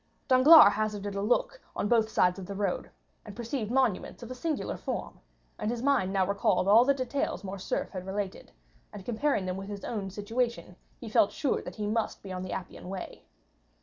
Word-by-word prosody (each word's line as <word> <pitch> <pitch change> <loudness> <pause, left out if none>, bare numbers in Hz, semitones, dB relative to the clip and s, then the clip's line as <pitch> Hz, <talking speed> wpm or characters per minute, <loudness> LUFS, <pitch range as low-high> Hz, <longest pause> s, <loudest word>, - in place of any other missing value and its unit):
Danglars 260 -3 +8
hazarded 205 -1 -2
a 200 - -2
look - - 0
on - - -1
both 225 -1 +3
sides 180 -3 +2
of 185 - -8
the 200 - -6
road, 200 -2 -2 0.3
and 210 -2 -10
perceived 235 -1 -3
monuments 245 -3 0
of 235 - -8
a - - -2
singular 300 +4 -3
form, - - -5 0.4
and 210 - -1
his 240 0 -3
mind 270 -9 +2
now 190 -1 +2
recalled 195 -1 +1
all 220 +4 +7
the 280 +2 +3
details 260 -3 -2
Morcerf 195 0 -3
had 185 -1 -7
related, 195 0 -4 0.4
and 195 -2 -10
comparing 240 -3 0
them 185 0 -3
with 195 0 -7
his 200 -1 -6
own 205 -4 -3
situation, 205 -2 -3 0.2
he 235 - -8
felt 210 -1 +3
sure 280 - -1
that - - -8
he 210 - -3
must 220 +1 -2
be 195 - -8
on 185 0 -4
the 185 - -6
Appian 180 -1 -6
Way. 190 -1 -7
210 Hz, 200 wpm, -29 LUFS, 195-245 Hz, 0.4 s, Danglars